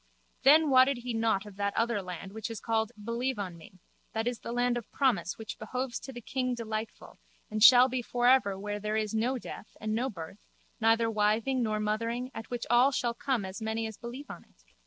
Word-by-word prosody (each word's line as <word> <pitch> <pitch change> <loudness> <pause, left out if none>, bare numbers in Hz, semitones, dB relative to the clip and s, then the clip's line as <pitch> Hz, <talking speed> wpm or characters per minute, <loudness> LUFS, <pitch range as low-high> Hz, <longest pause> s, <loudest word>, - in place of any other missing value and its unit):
Then 300 +2 +6
wotted 260 +1 +5
he 245 0 -5
nought 225 -3 +1
of 205 -2 -12
that 200 0 -1
other 230 -2 +1
land 180 +1 -7
which 220 0 -5
is 225 -2 -5
called 225 -1 0
Believe 235 +3 -2
on 190 -4 -4
Me, 170 +3 -15 0.4
that 225 +1 -1
is 245 -1 -2
the - - -6
land 245 0 +1
of 240 -3 -6
promise 205 -10 +1
which 220 -1 -7
behoves 250 +2 -3
to 270 - -9
the 240 -2 -8
king 255 +1 -2
Delightful 220 -1 -6 0.3
and 215 0 -2
shall 245 +2 +9
be 255 -1 -2
for 245 +1 -2
ever 245 -7 +4
where 205 +1 -4
there 210 +1 -1
is 215 0 -1
no 240 +4 +1
death 220 - -10
and 215 0 -2
no 245 +4 0
birth 170 -1 -9 0.4
neither 225 0 +3
wiving 220 +4 +1
nor 215 -2 0
mothering 230 +4 -2
at 225 - -8
which 240 -1 -3
all 245 +3 +5
shall 240 -3 0
come 260 -5 -1
as 190 +4 -7
many 220 +1 -2
as 220 -1 -6
believe 245 +6 -8
on - - -10
it? - - -30
225 Hz, 220 wpm, -30 LUFS, 215-245 Hz, 0.4 s, shall